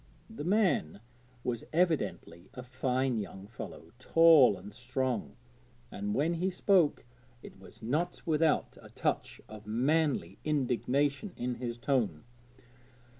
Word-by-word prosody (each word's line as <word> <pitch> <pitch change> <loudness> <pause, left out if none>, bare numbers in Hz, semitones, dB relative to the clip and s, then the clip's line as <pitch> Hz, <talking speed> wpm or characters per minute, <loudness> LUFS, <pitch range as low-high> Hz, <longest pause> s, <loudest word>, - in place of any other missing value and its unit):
The 220 - -6
man 180 - +1 0.4
was 120 -2 -2
evidently 125 - -1
a 125 - -7
fine 130 -1 -1
young 95 -1 -7
fellow, 110 +3 -9
tall 155 -7 +6
and 100 +3 -11
strong, 125 +1 -3 0.6
and 105 +1 -3
when 155 +5 +1
he 180 +3 0
spoke 180 - +2 0.4
it - - -12
was 95 - -14
not 155 +10 -1
without 160 -1 +1
a - - -13
touch - - -2
of 110 0 -11
manly 145 +7 0
indignation 145 - 0
in 125 0 -2
his 120 -1 -5
tone. 120 - 0
130 Hz, 125 wpm, -31 LUFS, 110-160 Hz, 0.6 s, tall